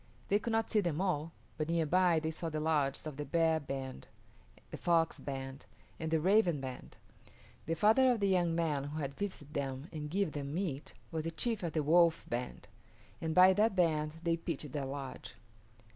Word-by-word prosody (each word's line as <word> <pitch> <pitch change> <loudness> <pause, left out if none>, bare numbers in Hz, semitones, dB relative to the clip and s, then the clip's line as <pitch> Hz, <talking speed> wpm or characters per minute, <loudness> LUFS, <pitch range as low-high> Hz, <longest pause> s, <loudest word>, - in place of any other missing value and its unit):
They 205 - +4
could 235 - -4
not 225 0 0
see 215 - +4
them 170 -4 -1
all, 165 -4 0 0.3
but 155 +1 -1
near 165 -1 +2
by 175 +1 +3
they 160 0 -2
saw 165 +1 -4
the 155 -1 -3
lodges 150 -3 0
of 150 -3 -6
the 150 - -3
Bear 165 0 +2
band, 135 -2 -6 0.6
the - - -5
Fox 165 -2 +2
band, 135 -3 -6 0.3
and 160 - -2
the 160 0 +2
Raven 180 -2 +3
band. 130 -1 -8 0.7
The 165 - 0
father 225 +9 +5
of 240 - 0
the 200 - +2
young 175 -3 +2
man 155 -5 0
who 145 +2 -5
had 140 -2 -3
visited 155 -6 -5
them 135 0 -3
and 150 -2 -5
given 190 0 0
them 145 0 -4
meat 165 -6 -3 0.2
was 160 -1 -3
the - - 0
chief 225 +6 -2
of 170 -3 -3
the 155 - +1
Wolf 170 +2 +4
band, 120 +1 -4 0.5
and 160 -1 -2
by 185 +1 +8
that 210 +1 +2
band 155 -4 +1
they 170 -1 +1
pitched 160 -4 -5
their 140 -2 -3
lodge. 135 -1 -7
160 Hz, 200 wpm, -33 LUFS, 145-180 Hz, 0.7 s, by